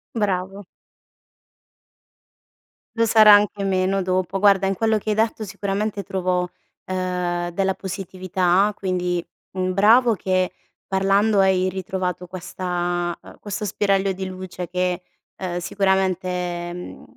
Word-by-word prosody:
Bravo. 195 -2 -2 2.3
Lo 230 0 +3
sarà 215 -1 +8
anche 205 0 +3
meno 190 0 +1
dopo. 185 +1 -1
Guarda 195 -1 +4
in 195 - 0
quello 220 +2 +1
che 215 - -5
hai 210 - +2
detto 220 0 0
sicuramente 200 +1 -3
trovo, 180 -1 -1 0.4
ehm, 180 -2 -2
della 190 +2 0
positività 185 0 0
quindi, 180 -2 -1 0.3
mhmm, 185 0 -1
bravo 230 +5 +5
che 185 -2 0 0.3
parlando 195 +2 +2
hai 185 -1 +3
ritrovato 185 -1 -3
questa 175 -1 -3
ehm, - - -14
questo 205 +1 -4
spiraglio 195 -1 +1
di 190 0 -4
luce 185 -1 -7
che, 180 0 -1 0.4
ehm, 180 -2 -3
sicuramente, 190 0 0 0.4
mhmm, 180 0 -8
190 Hz, 120 wpm, -22 LUFS, 180-200 Hz, 2.3 s, sarà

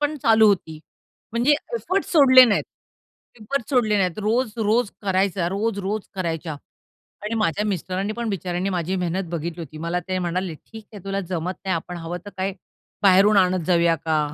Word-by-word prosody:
पण 295 +1 0
चालू 220 -1 +5
होती, 160 -5 -1 0.5
म्हणजे 240 +5 +3 0.2
एफर्ट्स 390 -5 -2
सोडले 260 -5 +8
नाहीत, 215 -4 +1 0.8
एफर्ट्स 240 +3 -3
सोडले 220 -5 +2
नाहीत. 185 +1 0
रोज-रोज 225 0 +1
करायचा. 190 -2 +1
रोज-रोज 200 0 -2
करायच्या 165 -4 -3 0.7
आणि 215 - -3
माझ्या 210 0 0
मिस्टरांनी 195 +1 -2
पण 235 -1 -3
बिचाऱ्यांनी 185 0 -2
माझी 180 0 -2
मेहनत 180 0 -2
बघितली 170 0 -4
होती 155 -1 -9
मला 175 +1 0
ते 185 0 -1
म्हणाले, 175 0 -2
"ठीक 220 +7 -13
आहे 200 - -10
तुला 195 0 -2
जमत 180 +1 -2
नाही 185 - +1
आपण 175 +2 -5
हवं 170 +1 -5
तर 205 - -7
काय 190 +1 -1 0.5
बाहेरून 200 +2 +6
आणत 185 -3 +2
जाऊया 170 -2 +3
का? 160 0 -1
190 Hz, 165 wpm, -23 LUFS, 175-215 Hz, 0.8 s, सोडले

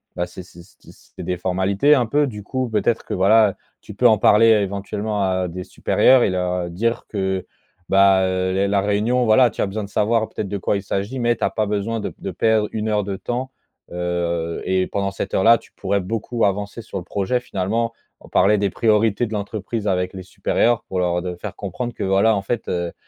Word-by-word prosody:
bah, 90 - -1
c'est 90 +1 -10
c'est 85 -1 -14
c 95 - -23
d - - -13
c'est - - -13
des 90 - -2
formalités 95 +9 +2
un 125 -5 +2
peu. 145 +5 +2
Du 105 -6 -6
coup, 130 +4 -3
peut-être 110 +1 0
que - - -5
voilà, 105 +3 +5
heu, - - -15 0.3
tu 105 - -11
peux 120 +5 +4
en 110 -2 +5
parler 110 +3 +5
éventuellement 100 0 0
à 95 -1 0
des 90 +2 -6
supérieurs 130 +6 +3
et 95 - +1
leur 90 -1 -2
dire 115 +6 -1
que, 95 -2 -2 0.4
bah, 95 -1 +5
heu, 95 0 -1
les 100 +1 +1
la 100 -1 +2
réunion, 105 +5 +1
voilà, 120 +2 +5
tu - - -5
as - - +1
besoin 105 +2 -4
de 100 - -8
savoir 110 +2 +1
peut-être 100 - -5
de 100 - -2
quoi 100 +1 0
il 100 - -6
s'agit, 100 +6 -3
mais 120 0 +2
tu - - -7
as - - +1
pas 110 -2 -1
besoin 105 +2 -2
de - - -3
p - - -16
de - - -5
perdre 110 -2 +1
1 110 0 -3
heure 105 -1 +1
de 95 -1 -4
temps, 130 +2 -4 0.4
heu 85 -1 -2
et 95 0 +1
pendant 100 -1 -2
cette - - -5
heure-là, 115 +5 +5
tu - - -20
pourrais 100 +1 -1
beaucoup 115 +4 -2
avancer 100 +3 -2
sur 100 - -7
le - - -9
projet 100 +7 -1
finalement. 115 +1 -2 0.3
On - - -16
parlait 105 +1 +3
des 100 0 +1
priorités 110 +1 +2
de 110 - -7
l'entreprise 105 +1 -4
avec 90 0 0
les 95 - -7
supérieurs, 115 +5 0
pour 95 -5 -4
leur 90 -1 0
de 90 -1 -4
faire - - -7
comprendre 120 +5 -5
que, - - -5
voilà 100 +3 +3
en 100 - -1
fait, 115 +3 -3
heu, 85 -1 -2
100 Hz, 230 wpm, -21 LUFS, 95-115 Hz, 0.4 s, voilà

